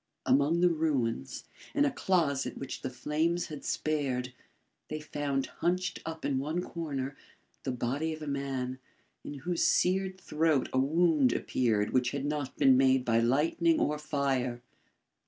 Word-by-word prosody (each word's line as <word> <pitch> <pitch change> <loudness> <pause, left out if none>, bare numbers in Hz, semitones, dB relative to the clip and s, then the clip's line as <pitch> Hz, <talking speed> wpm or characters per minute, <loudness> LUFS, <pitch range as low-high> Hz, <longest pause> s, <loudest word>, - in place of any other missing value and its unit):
Among 145 +6 +3
the 180 -1 +5
ruins, 135 - -1 0.3
in 290 0 +4
a 285 - +1
closet 165 - 0
which 135 - -6
the 130 - -3
flames 160 +7 -1
had 150 -2 -7
spared, 130 -5 -1 0.6
they 155 - -3
found 145 -3 -2 0.2
hunched 180 +1 0
up 160 0 -5
in 135 -2 +1
one 155 +5 -2
corner, 140 -6 -4 0.5
the 135 - -2
body 130 +6 -1
of 155 0 -6
a - - -6
man, 135 -2 -3 0.4
in 145 - -6
whose 170 +5 -1
seared 190 +1 +2
throat 155 -5 +1
a 130 - +3
wound 150 -2 +3
appeared 110 -5 0
which 125 -1 +2
had 140 0 -2
not 145 -2 -3
been 135 -2 +6
made 130 -1 +4
by 115 -1 +3
lightning 155 +7 +2
or 150 0 0
fire. 135 -5 -1
145 Hz, 155 wpm, -30 LUFS, 130-160 Hz, 0.6 s, been